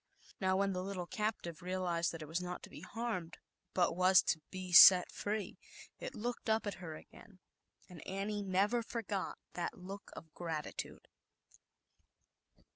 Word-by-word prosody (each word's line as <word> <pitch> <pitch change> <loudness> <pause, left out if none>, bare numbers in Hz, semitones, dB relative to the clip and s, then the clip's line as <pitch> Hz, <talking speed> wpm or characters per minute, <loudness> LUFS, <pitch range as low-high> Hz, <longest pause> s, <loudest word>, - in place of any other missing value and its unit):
Now, 190 -1 +2
when 195 0 +1
the 180 - -2
little 185 -1 -4
cap 215 +3 -2
e 170 - -3
realized 180 -2 -1
that 165 -2 -7
it - - -9
was 165 +4 -2
not 180 0 -5
to - - -11
be - - -10
harmed, 225 -8 -4 0.4
but 175 -2 +2
was 185 +1 +6
to 160 - 0
be 185 -1 -6
set 180 0 +10
free, 205 -2 -3 0.4
it 260 - -6
looked 235 +1 -4
up 220 0 +2
at 205 - -2
her 160 -3 -6
again, 195 +4 -15 0.5
and 180 -5 -11
Annie 200 +2 -2
never 200 +5 +1
forgot 215 -4 -4 0.2
that 175 - -3
look 195 +2 -9
of 160 -2 -11
gratitude. 160 -3 -5
185 Hz, 160 wpm, -35 LUFS, 175-205 Hz, 0.5 s, set